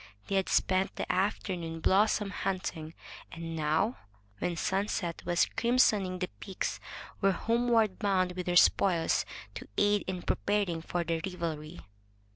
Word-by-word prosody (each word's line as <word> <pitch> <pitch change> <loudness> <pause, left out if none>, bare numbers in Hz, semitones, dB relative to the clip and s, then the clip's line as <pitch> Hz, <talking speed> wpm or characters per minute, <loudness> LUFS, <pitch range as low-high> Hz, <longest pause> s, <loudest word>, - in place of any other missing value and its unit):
They - - -2
had 195 -1 +1
spent 185 0 +2
the - - -3
afternoon 180 -4 -1
blossom 205 +3 +3
hunting, 180 -5 -3 0.4
and 165 -1 -6
now, 160 +9 +1 0.4
when 175 - -1
sunset 190 -2 -1
was 175 0 +3
crimsoning 225 -6 +3
the 180 0 -2
peaks, 190 -2 -3 0.4
were 195 -1 +4
homeward 230 -2 +2
bound 190 -3 +2
with 180 0 -5
their 175 - +1
spoils, 175 -1 +4 0.3
to - - -8
aid 205 0 +3
in 185 -1 -3
preparing 200 -5 0
for 175 +1 -2
the 165 -1 -1
revelry. 170 -3 -4
185 Hz, 135 wpm, -30 LUFS, 170-200 Hz, 0.4 s, were